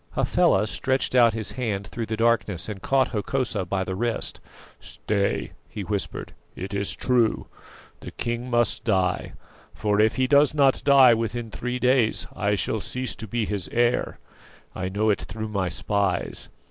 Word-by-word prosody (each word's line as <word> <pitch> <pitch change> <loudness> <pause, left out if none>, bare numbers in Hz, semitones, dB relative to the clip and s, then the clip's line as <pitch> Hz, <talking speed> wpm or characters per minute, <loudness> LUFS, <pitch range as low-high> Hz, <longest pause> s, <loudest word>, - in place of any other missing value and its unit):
Hafela 95 +2 +3
stretched 130 +5 -1
out 120 -3 +5
his 110 -2 -2
hand 105 -6 -3
through 115 +1 -5
the 110 - -3
darkness, 115 -6 +1
and 105 -3 -6
caught 135 +3 +2
Hokosa 110 -2 -2
by 95 +1 -1
the 95 - -4
wrist. 115 +4 -2 0.4
"Stay," 100 -1 -2 0.2
he 105 - -6
whispered, 100 0 -4 0.2
"it 95 +2 -6
is 100 0 -1
true. 120 -3 +1 0.5
The - - -8
king 120 +1 -4
must 120 -1 +1
die; 95 -4 0 0.4
for 105 -1 0
if 110 +1 +3
he 130 - +2
does 145 +2 +4
not 140 -2 +3
die 135 -3 +7
within 115 0 -3
three 125 +2 -3
days, 125 -2 +2
I 105 0 +1
shall 105 +2 -1
cease 130 +3 -4
to 110 - -7
be 115 +1 -1
his 100 -6 -3
heir. 120 +1 +1 0.6
I 95 - -3
know 105 +3 +1
it 100 - -1
through 110 -1 -6
my 100 -4 -1
spies. 100 +1 -1
110 Hz, 165 wpm, -25 LUFS, 100-125 Hz, 0.6 s, die